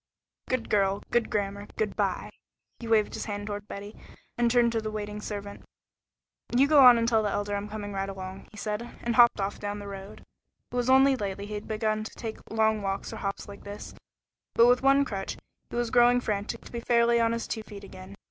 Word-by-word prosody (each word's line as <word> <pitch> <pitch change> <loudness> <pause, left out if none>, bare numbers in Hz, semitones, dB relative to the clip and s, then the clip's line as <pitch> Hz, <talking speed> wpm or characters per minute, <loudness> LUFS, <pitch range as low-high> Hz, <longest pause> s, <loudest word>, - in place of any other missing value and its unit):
"Good 255 -3 -1
girl. 195 -1 +1
Good 240 -1 +2
grammar. 200 0 -2
Good 215 -2 -1
by." - - -1 0.5
He 235 - -7
waved 220 -2 +3
his - - -4
hand 205 -1 -4
toward 205 0 -5
Betty, 205 +1 -8 0.4
and 240 0 +2
turned 240 0 +4
to 225 -1 -1
the 215 - -3
waiting 210 -1 -5
servant. 205 -1 -6 0.9
"You 275 +2 +6
go 290 -2 +7
on 245 -2 +9
and 230 0 +1
tell 225 -2 +3
the 210 - 0
Elder 205 0 -2
I'm 200 +1 -4
coming 205 -1 -5
right 195 0 -2
along," 190 0 -7
he 210 - -15
said, 210 +1 -3 0.2
and 235 -1 0
hopped 240 -3 +6
off 195 +1 -2
down 205 0 -4
the 205 -1 -8
road. 195 0 -9 0.5
It - - -6
was 245 0 0
only 265 +1 +6
lately 200 -3 -4
he 210 - -7
had 210 0 -5
begun 215 0 -1
to 220 - -9
take 225 -2 -6
long 220 -1 +2
walks 195 +2 -3
or - - -6
hops 195 -2 -4
like 200 0 -11
this, 205 +1 -8 0.6
with 235 - +7
but 245 0 +4
one 275 +1 +4
crutch, 195 -5 -4 0.3
but - - -7
he - - 0
was 240 -1 -1
growing 245 0 +5
frantic 210 -3 -3
to - - -12
be 235 - -4
fairly 235 0 +3
on 230 0 +3
his 230 0 -2
two 220 - -3
feet 205 -2 -11
again. 190 0 -11
215 Hz, 225 wpm, -28 LUFS, 205-235 Hz, 0.9 s, on